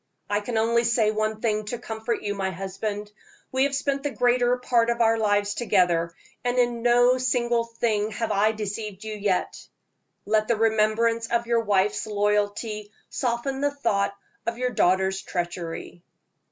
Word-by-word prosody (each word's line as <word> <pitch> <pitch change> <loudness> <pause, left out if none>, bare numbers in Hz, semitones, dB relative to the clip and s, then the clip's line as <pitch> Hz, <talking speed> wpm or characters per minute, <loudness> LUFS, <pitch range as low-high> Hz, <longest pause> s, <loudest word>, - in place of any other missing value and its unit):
"I 205 - +2
can 225 +2 -3
only 230 +1 +3
say 230 -2 +2
one 215 0 -2
thing 215 -2 0
to 240 +4 -4
comfort 225 0 -4
you, 205 - -1
my 195 -1 -2
husband. 195 +3 -5 0.4
We 260 +1 +3
have 280 0 -1
spent 275 0 -1
the 290 - -1
greater 245 -1 +2
part 240 -2 +2
of 235 0 0
our 225 -1 +3
lives 205 -1 +1
together, 180 -7 +2 0.3
and 245 0 0
in 240 -1 +1
no 245 +1 +4
single 240 -2 +1
thing 225 -2 -1
have 225 0 -2
I 210 +2 +3
deceived 210 -1 -5
you 220 0 -5
yet. 205 -3 -2 0.6
Let 215 +1 +2
the 235 - +2
remembrance 225 +1 +2
of 235 0 0
your 235 0 +2
wife's 205 -1 +1
loyalty 210 +1 -1 0.2
soften 260 +2 -2
the 285 - +3
thought 205 -8 0 0.3
of 230 0 -1
your 250 0 -1
daughter's 190 -1 +2
treachery." 175 -1 -5
220 Hz, 165 wpm, -25 LUFS, 205-240 Hz, 0.6 s, no